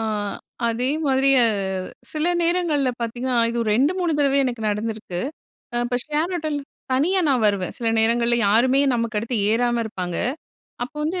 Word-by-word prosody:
அ -, -, -2 dB, 0.7 s
அதே 240 Hz, +3 st, 0 dB, 0.2 s
மாதிரி 270 Hz, 0 st, +3 dB, 0.2 s
அ, -, -, +5 dB, 0.7 s
சில 310 Hz, +2 st, -1 dB, 0.2 s
நேரங்கள்ல 335 Hz, -5 st, +1 dB
பாத்தீங்கன்னா, 240 Hz, +2 st, -2 dB
இது 235 Hz, -, -3 dB
ஒரு 215 Hz, -, -1 dB
2,3 340 Hz, +5 st, +1 dB
தடவ 280 Hz, -1 st, +3 dB
எனக்கு 240 Hz, -3 st, -3 dB
நடந்திருக்கு. 210 Hz, -4 st, -3 dB, 0.6 s
இப்ப 245 Hz, 0 st, -1 dB
ஷேர் 310 Hz, +4 st, -1 dB
ஆட்டோல 310 Hz, -3 st, -2 dB, 0.3 s
தனியா 350 Hz, +9 st, +2 dB
நான் 255 Hz, -5 st, +2 dB
வருவேன். 200 Hz, -3 st, 0 dB
சில 235 Hz, -, -4 dB
நேரங்கள்ல 235 Hz, +1 st, +2 dB
யாருமே 255 Hz, +6 st, +4 dB
நமக்கு 230 Hz, -2 st, -1 dB
அடுத்து 230 Hz, +2 st, -2 dB
ஏறாம 240 Hz, +1 st, +1 dB
இருப்பாங்க. 180 Hz, -5 st, -4 dB, 0.7 s
அப்ப 260 Hz, +6 st, -5 dB
வந்து 355 Hz, +4 st, -1 dB
245 Hz, 150 wpm, -22 LUFS, 230-295 Hz, 0.7 s, அ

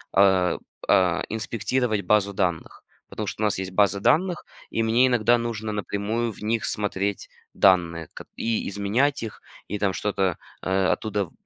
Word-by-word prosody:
э, 95 Hz, -3 st, +4 dB, 0.3 s
э, 90 Hz, -3 st, +3 dB
инспектировать 110 Hz, 0 st, -1 dB
базу 100 Hz, +1 st, +2 dB
данных, 90 Hz, -4 st, -2 dB, 0.3 s
потому 105 Hz, -2 st, -5 dB
что 105 Hz, +2 st, -4 dB
у -, -, +4 dB
нас 100 Hz, -2 st, 0 dB
есть 95 Hz, 0 st, -4 dB
база 100 Hz, 0 st, +2 dB
данных 170 Hz, -, +2 dB, 0.3 s
и 115 Hz, -, 0 dB
мне 115 Hz, +3 st, +4 dB
иногда 120 Hz, -1 st, +3 dB
нужно 110 Hz, -2 st, -3 dB
напрямую 105 Hz, +3 st, -2 dB
в -, -, -14 dB
них 110 Hz, 0 st, 0 dB
смотреть 100 Hz, -1 st, -2 dB, 0.2 s
данные 85 Hz, -4 st, +3 dB
ко -, -, -9 dB
и 115 Hz, -1 st, -1 dB
изменять 105 Hz, +9 st, 0 dB
их 110 Hz, -, -7 dB, 0.3 s
и 105 Hz, -, -3 dB
там 100 Hz, -2 st, 0 dB
что-то, 95 Hz, -4 st, -1 dB, 0.3 s
э, 95 Hz, +1 st, +1 dB
оттуда 105 Hz, +1 st, 0 dB
вы -, -, -19 dB
105 Hz, 160 wpm, -25 LUFS, 95-115 Hz, 0.3 s, э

